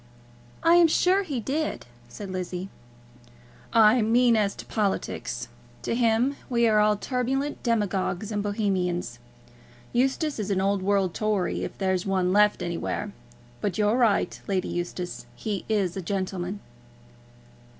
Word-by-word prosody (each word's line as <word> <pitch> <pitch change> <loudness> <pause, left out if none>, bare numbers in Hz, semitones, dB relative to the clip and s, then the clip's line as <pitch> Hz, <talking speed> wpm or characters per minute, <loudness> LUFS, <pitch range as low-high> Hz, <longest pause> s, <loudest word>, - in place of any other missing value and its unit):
"I 335 +1 +6
am 345 -1 +7
sure 365 +4 +3
he 295 -10 -3
did," 290 +7 -2 0.2
said 195 - -8
Lizzie. 185 0 -4 1.0
"I 225 +1 +6
mean 235 +2 +4
as 205 -2 +1
to - - -9
politics. 120 - -2 0.4
To - - -1
him 235 +3 +2
we 235 -2 +3
are 215 -1 +4
all 210 0 +3
turbulent 265 +5 -2
demagogues 210 -3 -1
and 205 -1 -1
Bohemians. 185 - -1 0.7
Eustace 270 +3 +1
is 210 -1 -3
an 195 -2 +1
old 195 0 +1
world 195 -2 +1
Tory, 210 -4 -1
if - - -6
there's 190 -2 0
one 185 -1 +1
left 210 0 +4
anywhere. 175 +4 -3 0.5
But 200 -4 -1
you're 210 +1 +3
right, 235 -5 +2
Lady 190 -2 -1
Eustace; 175 +1 -4
he 205 -3 -4
is 195 -5 +1
a 190 - -3
gentleman." 190 +1 -3
205 Hz, 140 wpm, -26 LUFS, 185-235 Hz, 1.0 s, am